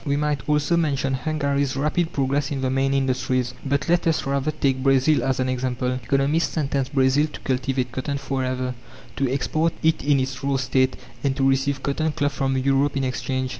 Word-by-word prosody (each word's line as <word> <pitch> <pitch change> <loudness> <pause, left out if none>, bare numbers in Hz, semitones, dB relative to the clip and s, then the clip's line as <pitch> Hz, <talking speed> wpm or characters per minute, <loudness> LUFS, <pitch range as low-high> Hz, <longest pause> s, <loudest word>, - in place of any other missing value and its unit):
We 140 -2 0
might 150 0 -1
also 150 +3 +2
mention 140 -4 0
Hungary's 140 -1 -1
rapid 155 +4 0
progress 140 0 0
in 140 -2 -3
the 130 -1 0
main 135 +1 +1
industries, 130 -2 0
but 140 +2 -1
let 175 0 +2
us 160 - +1
rather 140 +1 0
take 135 -3 0
Brazil 135 +1 +3
as 130 0 0
an 130 - +1
example. 125 0 -1
Economists 140 +6 +1
sentenced 140 -3 -1
Brazil 135 +3 +3
to - - -8
cultivate 130 -1 -1
cotton 140 +3 -3
forever, 130 -2 -2 0.4
to 135 -2 0
export 155 +4 0
it 160 0 +2
in 140 -1 +3
its 130 +1 -3
raw 140 0 +1
state, 130 0 +1 0.3
and 135 -1 +1
to 135 -1 +2
receive 135 +1 +1
cotton 155 +2 0
cloth 145 0 0
from 135 -1 0
Europe 135 +2 +1
in 135 - 0
exchange. 130 0 -2
135 Hz, 190 wpm, -23 LUFS, 130-145 Hz, 0.4 s, Brazil